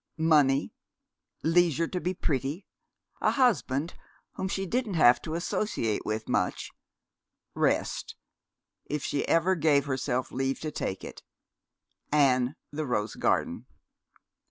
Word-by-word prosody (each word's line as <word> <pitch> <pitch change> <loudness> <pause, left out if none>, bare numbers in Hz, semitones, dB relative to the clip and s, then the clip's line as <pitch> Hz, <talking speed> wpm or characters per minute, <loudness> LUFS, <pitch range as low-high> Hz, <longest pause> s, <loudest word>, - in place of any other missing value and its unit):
Money, 150 -4 +3 0.7
leisure 165 -1 +3
to 180 +1 -4
be 180 - 0
pretty, 150 0 -2 0.6
a - - +3
husband 165 - +1 0.4
whom 190 - -3
she 195 0 -2
"didn't 220 0 -1
have 125 -6 +6
to 160 -1 -4
associate 170 - -1
with 110 +1 -2
much," - - -1 0.8
rest, - - 0 0.7
if 150 -1 -3
she 140 - -1
ever 165 +3 +3
gave 150 -5 +3
herself 130 -2 -2
leave 135 +1 -1
to 155 - -4
take 95 -8 -4
it, - - -9 0.9
and 135 -2 +3 0.2
the 150 0 -3
rose 105 -3 -1
garden. - - 0
150 Hz, 120 wpm, -28 LUFS, 130-170 Hz, 0.9 s, have